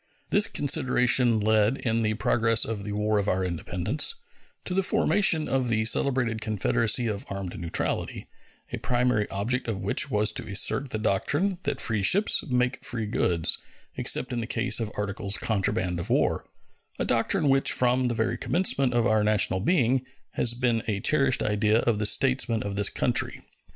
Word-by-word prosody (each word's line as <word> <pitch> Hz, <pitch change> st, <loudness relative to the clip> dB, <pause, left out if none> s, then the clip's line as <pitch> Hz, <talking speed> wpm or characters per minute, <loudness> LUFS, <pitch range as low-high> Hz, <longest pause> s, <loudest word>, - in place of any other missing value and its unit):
This 205 Hz, -, +4 dB
consideration 125 Hz, -5 st, +2 dB
led, 110 Hz, +3 st, +2 dB
in 115 Hz, -3 st, -1 dB
the 110 Hz, -1 st, -1 dB
progress 115 Hz, 0 st, +1 dB
of 110 Hz, -3 st, -5 dB
the 105 Hz, -, -6 dB
War 105 Hz, 0 st, 0 dB
of 100 Hz, -, -3 dB
our 95 Hz, -1 st, 0 dB
Independence, 90 Hz, -, -2 dB, 0.5 s
to 180 Hz, -, -2 dB
the 195 Hz, -, +2 dB
formation 180 Hz, -4 st, +2 dB
of 130 Hz, -2 st, -1 dB
the 110 Hz, -1 st, 0 dB
celebrated 120 Hz, -1 st, +1 dB
confederacy 110 Hz, +3 st, +1 dB
of 105 Hz, -3 st, -3 dB
armed 100 Hz, -3 st, -6 dB
neutrality, 85 Hz, -1 st, -3 dB, 0.5 s
a -, -, -2 dB
primary 125 Hz, -4 st, 0 dB
object 115 Hz, +7 st, -2 dB
of 100 Hz, -4 st, -4 dB
which 95 Hz, -, +1 dB
was 105 Hz, 0 st, +2 dB
to -, -, -4 dB
assert 130 Hz, +7 st, +1 dB
the 110 Hz, -, -3 dB
doctrine 150 Hz, -, 0 dB
that -, -, -2 dB
free 110 Hz, -3 st, 0 dB
ships 200 Hz, -, +3 dB
make 125 Hz, 0 st, -1 dB
free 115 Hz, -3 st, -3 dB
goods, 85 Hz, -5 st, +1 dB, 0.4 s
except 125 Hz, -, 0 dB
in 120 Hz, -, -2 dB
the 115 Hz, -, -4 dB
case 125 Hz, +1 st, +1 dB
of 115 Hz, -2 st, -3 dB
articles 100 Hz, 0 st, -2 dB
contraband 95 Hz, -4 st, -1 dB
of 85 Hz, -, -5 dB
war -, -, 0 dB, 0.5 s
a -, -, -2 dB
doctrine 145 Hz, +8 st, +1 dB
which 135 Hz, 0 st, +2 dB
from 125 Hz, 0 st, +1 dB
the 120 Hz, -, -2 dB
very 110 Hz, +1 st, -2 dB
commencement 140 Hz, -8 st, 0 dB
of 120 Hz, -1 st, +2 dB
our 110 Hz, -2 st, +2 dB
national 105 Hz, -3 st, +1 dB
being 130 Hz, -, +1 dB, 0.3 s
has 120 Hz, 0 st, +1 dB
been 120 Hz, -2 st, 0 dB
a 105 Hz, -3 st, -1 dB
cherished 135 Hz, +2 st, +1 dB
idea 105 Hz, +1 st, +1 dB
of 115 Hz, -3 st, 0 dB
the 105 Hz, -, +2 dB
statesmen 125 Hz, -3 st, +2 dB
of 100 Hz, -1 st, -5 dB
this 100 Hz, -1 st, +1 dB
country. -, -, -1 dB
115 Hz, 175 wpm, -26 LUFS, 105-125 Hz, 0.5 s, This